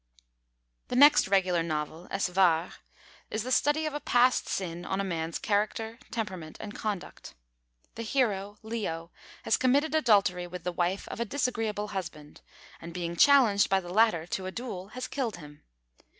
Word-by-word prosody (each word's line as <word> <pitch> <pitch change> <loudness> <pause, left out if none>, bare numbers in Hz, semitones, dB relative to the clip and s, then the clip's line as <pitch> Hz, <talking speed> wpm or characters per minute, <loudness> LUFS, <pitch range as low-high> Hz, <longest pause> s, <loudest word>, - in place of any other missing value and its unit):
The - - -3
next 290 -2 +7
regular 185 -3 +2
novel, 160 +1 -4
Es 195 0 0
War, 180 -2 +2 0.6
is 215 - -2
the 255 - -5
study 295 +4 +2
of 305 - -2
a 295 - -3
past 250 -2 +3
sin 175 -2 -3
on 190 +2 -2
a - - 0
man's 165 -3 -3
character, 220 +2 -1
temperament, 190 -9 -5
and 210 -1 -7
conduct. 205 - -5 0.6
The 230 - -7
hero, 210 -4 -1
Leo, 185 -7 -4 0.3
has - - +2
committed 280 +5 +2
adultery 200 - +3
with 180 -1 -8
the 180 - -2
wife 175 +2 -1
of - - -6
a - - +1
disagreeable 225 -6 -2
husband, 155 -6 -7 0.4
and, 170 +1 -9
being 170 -1 -3
challenged 240 -4 +5
by 195 - +3
the 175 -1 -8
latter 215 -6 +3
to 185 +2 -4
a - - -4
duel, 195 -5 -6
has 255 +4 -6
killed 255 -6 -3
him. 150 -3 -13
195 Hz, 165 wpm, -29 LUFS, 175-235 Hz, 0.6 s, next